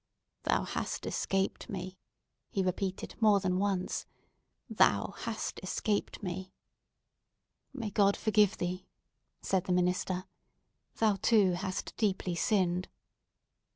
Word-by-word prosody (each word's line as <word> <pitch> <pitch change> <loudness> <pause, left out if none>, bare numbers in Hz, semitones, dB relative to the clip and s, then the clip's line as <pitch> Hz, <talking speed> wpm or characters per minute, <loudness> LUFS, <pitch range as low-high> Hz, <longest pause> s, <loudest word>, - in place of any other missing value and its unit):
"Thou - - +2
hast - - -3
escaped 195 +4 -1
me!" 185 -2 -5 0.5
he 195 -4 0
repeated 185 +1 -2
more 210 -2 +6
than 185 -1 0
once. 195 -2 -1 0.6
"Thou - - +3
hast - - -4
escaped 210 -1 -1
me!" 185 0 -5 1.2
"May 235 -7 -4
God 200 0 +4
forgive 210 -1 +3
thee!" 180 +1 -3 0.6
said 190 -2 +1
the - - -2
minister. 180 +1 0 0.7
"Thou, 215 -3 +3
too, 210 -5 +5
hast 185 +1 -3
deeply 190 -4 0
sinned!" 180 -1 +1
190 Hz, 110 wpm, -31 LUFS, 185-205 Hz, 1.2 s, more